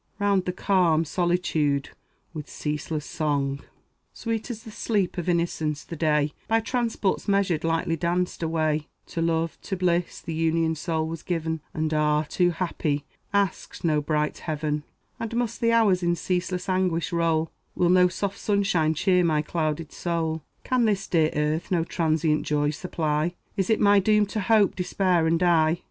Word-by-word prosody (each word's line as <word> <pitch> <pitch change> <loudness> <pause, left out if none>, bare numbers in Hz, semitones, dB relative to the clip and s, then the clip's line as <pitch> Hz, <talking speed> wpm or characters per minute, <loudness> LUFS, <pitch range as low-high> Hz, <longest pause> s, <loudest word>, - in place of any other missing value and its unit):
Round 200 -2 +2
the 180 - 0
calm 180 -4 +2
solitude 160 -4 0 0.4
with 150 -3 -7
ceaseless 150 0 -3
song, 140 -3 -1 0.5
Sweet 225 0 -3
as 225 -2 -6
the 220 - -10
sleep 205 -4 -1
of 175 - -2
innocence 160 -3 0
the 170 - -7
day, 150 -2 +1
By 225 +1 +3
transports 225 -4 -1
measured, 195 -5 +1
lightly 165 +1 0
danced 175 +3 -1
away; 155 -2 0 0.2
To 165 - -3
love, 165 0 0
to 190 - -4
bliss, 175 -1 0
the 165 - -6
unioned 160 0 +1
soul 160 -1 -1
was 165 0 -5
given, 160 -2 -2
And 155 0 -2
ah, 150 0 +2
too 175 +2 +2
happy! 160 -4 -2 0.3
asked 200 -3 -1
no 155 -3 +2
brighter 150 0 -1
heaven. 150 -1 -2 0.3
And 230 0 -4
must 235 -2 -2
the 230 0 +3
hours 210 -6 +4
in 175 0 +1
ceaseless 180 +1 -2
anguish 185 -3 0
roll? 165 -1 +1 0.2
Will 175 - +2
no 180 0 +6
soft 195 +2 -3
sunshine 195 -6 +1
cheer 180 +3 +3
my 155 -3 +2
clouded 155 -1 -2
soul? 165 -2 -2 0.2
Can 255 -2 +2
this 200 -3 +1
dear 160 -3 +2
earth 150 +2 0
no 175 -3 +2
transient 160 -2 +1
joy 145 0 +1
supply? 155 0 -1 0.2
Is 195 -1 -1
it 220 - +3
my 205 0 +5
doom 210 +1 +3
to 210 +2 -4
hope, 210 0 +3
despair, 180 -2 +1
and 165 +1 +3
die? 165 -2 +3
170 Hz, 165 wpm, -25 LUFS, 155-185 Hz, 0.5 s, no